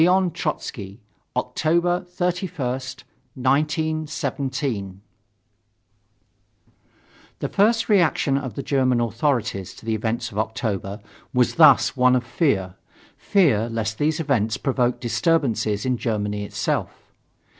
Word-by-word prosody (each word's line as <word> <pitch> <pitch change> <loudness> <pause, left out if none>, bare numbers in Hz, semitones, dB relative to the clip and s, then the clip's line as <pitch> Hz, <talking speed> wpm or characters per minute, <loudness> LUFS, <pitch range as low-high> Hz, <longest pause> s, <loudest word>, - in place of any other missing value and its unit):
Trotzky, 105 - -4 0.4
Oct. - - -3
31st, 170 -6 -1 0.3
1917."] 140 - -1 2.4
The - - -3
first 220 +1 +2
reaction 170 -8 +3
of 130 -6 -3
the 140 - -4
German 130 -3 +2
authorities 115 - -1
to - - -14
the 115 - 0
events 110 +2 -2
of 105 - -4
October 105 -2 -3 0.3
was 125 -1 +3
thus 155 -4 +6
one 125 -1 +4
of 125 - +1
fear 115 - 0 0.4
fear 135 - +2
lest 110 -1 -3
these 155 +2 +1
events 120 -8 0
provoke 125 -3 0
disturbances 115 -3 0
in 130 -1 +1
Germany 105 -3 -2
itself. - - -3
130 Hz, 100 wpm, -23 LUFS, 110-155 Hz, 2.4 s, thus